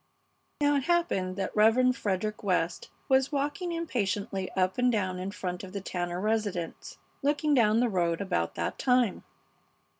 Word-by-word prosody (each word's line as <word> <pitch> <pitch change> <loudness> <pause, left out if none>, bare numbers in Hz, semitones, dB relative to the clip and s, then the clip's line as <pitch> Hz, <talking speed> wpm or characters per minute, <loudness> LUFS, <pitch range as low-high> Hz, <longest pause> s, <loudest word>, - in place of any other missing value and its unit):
Now 290 0 +4
it 270 - -2
happened 335 - +1
that 190 -1 -3
Rev. 240 +4 +4
Frederick 210 -1 -2
West 180 -3 -1 0.2
was 265 +1 +3
walking 290 +5 -2
impatiently 205 - -2
up 185 +3 0
and 250 0 +4
down 185 -5 -1
in 185 +1 -3
front 180 -2 -5
of 190 0 -9
the 200 - -4
Tanner 175 -2 -3
residence, 205 -5 -2 0.2
looking 295 +1 +1
down 225 -3 +4
the 245 - +3
road 170 -5 0
about 85 - -1
that 85 - -3
time. 250 -6 +2
210 Hz, 155 wpm, -29 LUFS, 185-255 Hz, 0.2 s, Now